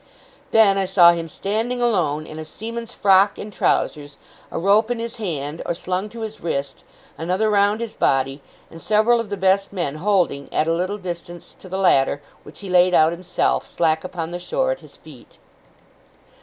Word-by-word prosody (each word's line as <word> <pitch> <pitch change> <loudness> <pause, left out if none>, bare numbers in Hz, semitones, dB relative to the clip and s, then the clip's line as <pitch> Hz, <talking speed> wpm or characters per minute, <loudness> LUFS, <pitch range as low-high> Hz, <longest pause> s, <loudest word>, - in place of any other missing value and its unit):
Then, 205 -3 +4
I 195 - +1
saw 180 -2 +6
him 170 -1 -3
standing 220 +9 -2
alone, 170 -11 0
in 155 - -9
a - - -5
seaman's 230 +8 -7
frock 195 0 +4
and 210 0 -8
trousers: 145 -5 -1 0.3
a - - -5
rope 205 +5 +3
in 245 - -1
his 230 0 -6
hand, 160 -7 -4
or 170 - -2
slung 185 +3 -3
to 230 +1 -9
his 220 -1 -6
wrist: 140 -4 -4 0.4
another 185 +6 0
round 205 +2 +2
his 230 -2 -5
body: 135 +1 0 0.3
and 165 - -11
several 220 +3 +3
of 230 -3 -4
the 200 - -3
best 190 +1 +2
men 170 -7 -3
holding, 175 -6 0
at 155 - +1
a 165 - +2
little 185 +4 -2
distance, 175 -2 -8
to 185 - -12
the 190 - -3
latter, 140 -7 +3 0.2
which 150 - -14
he 195 - -7
laid 180 0 +5
out 160 +1 +5
himself, 175 +1 -1
slack 160 -2 0
upon 175 -3 -5
the 175 - -4
shore, - - -1
at - - -3
his - - -17
feet. - - -16
185 Hz, 190 wpm, -21 LUFS, 165-210 Hz, 0.4 s, saw